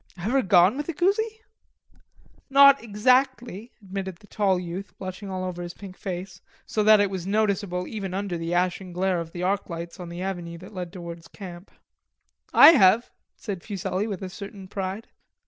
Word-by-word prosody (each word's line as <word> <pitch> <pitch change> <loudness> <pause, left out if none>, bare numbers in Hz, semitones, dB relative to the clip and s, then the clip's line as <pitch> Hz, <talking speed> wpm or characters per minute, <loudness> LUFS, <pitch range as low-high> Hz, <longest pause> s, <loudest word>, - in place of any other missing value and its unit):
"Ever 230 +10 +1
gone 185 +2 +5
with 295 +2 -4
a 335 - -3
coosie?" 440 +6 0 1.1
"Not 280 0 +7
exactly," 245 0 +1
admitted 190 -1 -5
the 205 - -20
tall 195 -3 +1
youth, 180 +3 -7
blushing 190 +1 -7
all 185 -1 -3
over 180 -1 -4
his 175 0 -7
pink 195 -2 -10
face, 180 -1 -6 0.2
so 215 - -1
that 215 0 +7
it 200 -1 +2
was 185 -2 -4
noticeable 200 -3 0
even 195 -3 -5
under 195 -2 -2
the 165 0 -4
ashen 180 +1 -1
glare 185 0 0
of 165 -1 -6
the 175 +1 -5
arc 195 +2 0
lights 170 +1 -7
on 175 -1 -7
the 175 +2 -6
avenue 175 -3 -4
that 185 +5 -12
led 180 -3 -5
towards 170 -3 -9
camp. 180 -2 -10 0.8
"I - - +10
have," 230 - +4 0.2
said 195 -5 -6
Fuselli, 195 0 -3
with 195 -3 -5
a 185 - -4
certain 200 0 -9
pride. 195 +2 -4
190 Hz, 180 wpm, -25 LUFS, 180-210 Hz, 1.1 s, I